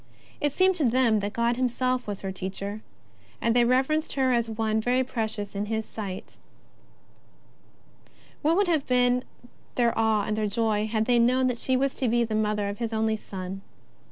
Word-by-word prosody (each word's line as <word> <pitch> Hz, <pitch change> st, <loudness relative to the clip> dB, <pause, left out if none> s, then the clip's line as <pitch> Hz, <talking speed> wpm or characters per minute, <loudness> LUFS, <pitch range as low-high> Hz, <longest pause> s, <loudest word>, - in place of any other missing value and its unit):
It 290 Hz, -, +1 dB
seemed 375 Hz, +5 st, +3 dB
to 315 Hz, -, 0 dB
them 235 Hz, -2 st, +3 dB
that 205 Hz, 0 st, -3 dB
God 235 Hz, +2 st, 0 dB
Himself 255 Hz, 0 st, 0 dB
was 205 Hz, -1 st, -4 dB
her 195 Hz, -, -3 dB
Teacher, 195 Hz, +3 st, -5 dB, 0.6 s
and 230 Hz, 0 st, +1 dB
they 245 Hz, -, +5 dB
reverenced 265 Hz, +6 st, +1 dB
her 260 Hz, -2 st, +2 dB
as 235 Hz, -1 st, +1 dB
one 220 Hz, 0 st, 0 dB
very 250 Hz, +3 st, +2 dB
precious 220 Hz, -5 st, -3 dB
in 205 Hz, +1 st, -3 dB
His 220 Hz, 0 st, -2 dB
sight. 195 Hz, -4 st, -7 dB, 2.0 s
What 320 Hz, +4 st, +2 dB
would 400 Hz, -1 st, +3 dB
have 315 Hz, -5 st, +1 dB
been 250 Hz, 0 st, +3 dB, 0.5 s
their 235 Hz, -2 st, +2 dB
awe 220 Hz, -2 st, +2 dB
and 210 Hz, +1 st, -1 dB
their 215 Hz, -1 st, 0 dB
joy 215 Hz, 0 st, 0 dB
had 220 Hz, 0 st, 0 dB
they 245 Hz, 0 st, +3 dB
known 255 Hz, +2 st, +3 dB
that 250 Hz, -2 st, 0 dB
she 260 Hz, +1 st, +1 dB
was 270 Hz, +1 st, +1 dB
to 260 Hz, -, 0 dB
be 235 Hz, +1 st, +2 dB
the 220 Hz, -1 st, -3 dB
Mother 210 Hz, -1 st, 0 dB
of 200 Hz, +2 st, -5 dB
His 230 Hz, -1 st, -3 dB
only 220 Hz, 0 st, +1 dB
Son! 190 Hz, -2 st, -7 dB
230 Hz, 185 wpm, -26 LUFS, 215-255 Hz, 2.0 s, they